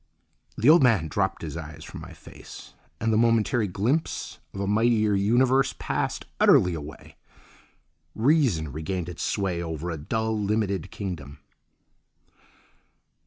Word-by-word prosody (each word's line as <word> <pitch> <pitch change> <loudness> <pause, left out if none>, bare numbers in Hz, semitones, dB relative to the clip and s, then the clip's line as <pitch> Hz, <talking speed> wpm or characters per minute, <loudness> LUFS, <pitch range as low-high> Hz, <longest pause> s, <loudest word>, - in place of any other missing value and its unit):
The 115 - +1
old 160 +2 +8
man 110 -11 +3
dropped - - -1
his - - -5
eyes 80 -2 -8
from - - -9
my - - -10
face, - - -13 0.3
and 110 0 0
the 110 - +3
momentary 115 -1 +2
glimpse 115 - -2
of 100 - -8
a 100 - -1
mightier 110 +1 +2
universe 125 +7 +2
passed - - -2
utterly 90 -1 +5
away. 75 -2 -9 1.0
Reason 115 - +2
regained 80 +4 -4
its 85 - -7
sway 95 -4 -1
over 80 0 -4
a 80 - -4
dull, 110 +7 -2
limited 100 -4 -1
kingdom. 80 -9 -6
100 Hz, 130 wpm, -26 LUFS, 85-115 Hz, 1.0 s, old